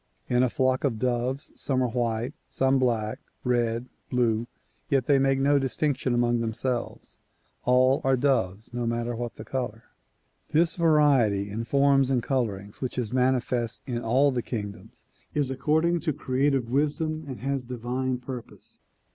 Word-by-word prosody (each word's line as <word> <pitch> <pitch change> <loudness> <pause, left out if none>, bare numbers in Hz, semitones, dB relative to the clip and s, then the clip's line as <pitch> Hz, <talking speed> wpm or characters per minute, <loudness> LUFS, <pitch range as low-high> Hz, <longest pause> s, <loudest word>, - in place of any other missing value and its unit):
In 125 0 +3
a 130 - +3
flock 130 +1 +1
of 130 -6 0
doves 125 +3 -1
some 130 -2 0
are 125 - 0
white, 120 +2 -1
some 135 0 +2
black, 115 -4 0 0.2
red, 120 -1 0 0.2
blue, 120 -2 +1 0.4
yet 135 -5 +2
they 140 -1 +4
make 135 0 +3
no 140 +1 +4
distinction 135 0 0
among 120 0 +2
themselves. 120 +2 -3 0.5
All 130 +2 +4
are 135 0 +3
doves 115 -6 0
no 120 -1 -2
matter 120 +1 -1
what 120 0 -5
the - - -9
color. 120 -4 -4 0.6
This 165 +1 +2
variety 140 - +3
in 115 +3 -3
forms 140 +1 +3
and 125 -3 +1
colorings 105 -7 -2
which 130 -1 -3
is 120 -2 -2
manifest 125 -2 0
in 120 -3 -3
all 130 +5 +3
the 125 -2 -1
kingdoms 105 -4 -7 0.3
is 145 -3 +1
according 160 +6 +1
to 155 -1 -1
creative 135 -2 0
wisdom 155 +3 0
and 130 -3 -7
has 135 0 -1
divine 125 +1 -2
purpose. 125 -1 -9
125 Hz, 155 wpm, -26 LUFS, 120-135 Hz, 0.6 s, they